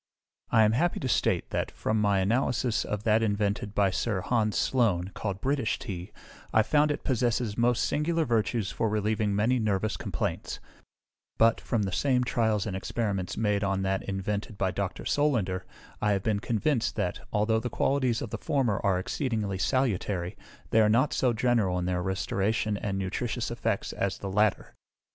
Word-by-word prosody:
I 110 Hz, -, +5 dB
am 105 Hz, -, +4 dB
happy 170 Hz, +10 st, +1 dB
to 135 Hz, -, -1 dB
state -, -, +1 dB
that, -, -, -1 dB
from 110 Hz, 0 st, -1 dB
my 100 Hz, -2 st, +3 dB
analysis 120 Hz, +3 st, +1 dB
of 105 Hz, 0 st, -3 dB
that 110 Hz, 0 st, +3 dB
invented 105 Hz, -1 st, -1 dB
by 100 Hz, -2 st, +3 dB
Sir 100 Hz, 0 st, -1 dB
Hans 110 Hz, +1 st, 0 dB
Sloane, 100 Hz, -8 st, +1 dB
called 100 Hz, -2 st, -4 dB
British 135 Hz, -4 st, 0 dB
Tea, 90 Hz, 0 st, -6 dB, 0.4 s
I 110 Hz, -, +4 dB
found 150 Hz, +6 st, +3 dB
it 150 Hz, -, -2 dB
possesses 120 Hz, -3 st, 0 dB
most 120 Hz, +1 st, +2 dB
singular 165 Hz, +2 st, +1 dB
virtues 115 Hz, -3 st, 0 dB
for 115 Hz, -, 0 dB
relieving 105 Hz, -1 st, 0 dB
many 120 Hz, +5 st, +2 dB
nervous 110 Hz, -1 st, 0 dB
complaints; -, -, -3 dB, 0.8 s
but, 115 Hz, 0 st, +4 dB
from 115 Hz, -3 st, 0 dB
the 95 Hz, -, -2 dB
same 125 Hz, +6 st, +2 dB
trials 110 Hz, -4 st, +1 dB
and 100 Hz, -4 st, -3 dB
experiments 95 Hz, -2 st, -2 dB
made 105 Hz, -2 st, +1 dB
on 95 Hz, -1 st, 0 dB
that 95 Hz, 0 st, 0 dB
invented 100 Hz, +2 st, -3 dB
by 95 Hz, -1 st, 0 dB
Dr. 100 Hz, -1 st, -4 dB
Solander, 110 Hz, -11 st, +1 dB, 0.4 s
I 105 Hz, -1 st, +2 dB
have 95 Hz, -1 st, -1 dB
been 105 Hz, -2 st, +1 dB
convinced 115 Hz, +2 st, 0 dB
that, 95 Hz, -4 st, -2 dB
although 110 Hz, +2 st, +2 dB
the 120 Hz, -, -3 dB
qualities 130 Hz, -1 st, +1 dB
of 115 Hz, -, -6 dB
the -, -, -4 dB
former 125 Hz, -8 st, 0 dB
are 95 Hz, -2 st, +2 dB
exceedingly 105 Hz, -1 st, -2 dB
salutary, 100 Hz, -7 st, 0 dB, 0.4 s
they 110 Hz, -, +5 dB
are 105 Hz, -, +4 dB
not 130 Hz, +6 st, +3 dB
so 125 Hz, -, +2 dB
general 110 Hz, -5 st, +1 dB
in 90 Hz, -, -1 dB
their 90 Hz, 0 st, 0 dB
restoration 100 Hz, +4 st, 0 dB
and 100 Hz, -1 st, -3 dB
nutritious 115 Hz, +5 st, -2 dB
effects 115 Hz, -3 st, -2 dB
as 100 Hz, -1 st, -1 dB
the 100 Hz, -, -5 dB
latter. 105 Hz, +1 st, +1 dB
105 Hz, 175 wpm, -28 LUFS, 100-120 Hz, 0.8 s, I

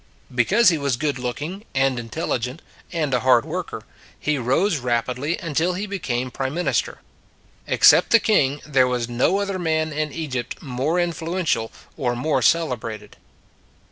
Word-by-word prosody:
Because 190 Hz, -, +4 dB
he 165 Hz, -3 st, 0 dB
was 140 Hz, -4 st, 0 dB
good 145 Hz, -2 st, -1 dB
looking, 150 Hz, -, -4 dB
and 135 Hz, -2 st, +2 dB
intel 120 Hz, +8 st, -5 dB
ligent, 125 Hz, +6 st, -2 dB, 0.3 s
and 155 Hz, -6 st, -1 dB
a 125 Hz, -, +3 dB
hard 125 Hz, -2 st, +4 dB
worker, -, -, -5 dB, 0.4 s
he 150 Hz, -2 st, 0 dB
rose 150 Hz, -, +1 dB
rapidly 125 Hz, +5 st, -1 dB
until 165 Hz, +1 st, 0 dB
he 195 Hz, +4 st, -3 dB
became 130 Hz, -11 st, -3 dB
prime 135 Hz, +4 st, -3 dB
minister. 180 Hz, -, -1 dB, 0.7 s
Except -, -, +6 dB
the 230 Hz, -, +6 dB
king 145 Hz, -12 st, +2 dB
there 135 Hz, -4 st, +3 dB
was 125 Hz, -2 st, -1 dB
no 120 Hz, +10 st, +1 dB
other 200 Hz, -2 st, -2 dB
man 160 Hz, -2 st, 0 dB
in 150 Hz, 0 st, -2 dB
Egypt 135 Hz, -6 st, -4 dB
more 140 Hz, +5 st, -1 dB
influential 165 Hz, -8 st, -1 dB, 0.3 s
or 125 Hz, -5 st, -1 dB
more 145 Hz, +6 st, 0 dB
celebrated. 115 Hz, -10 st, 0 dB
145 Hz, 150 wpm, -22 LUFS, 125-170 Hz, 0.7 s, Except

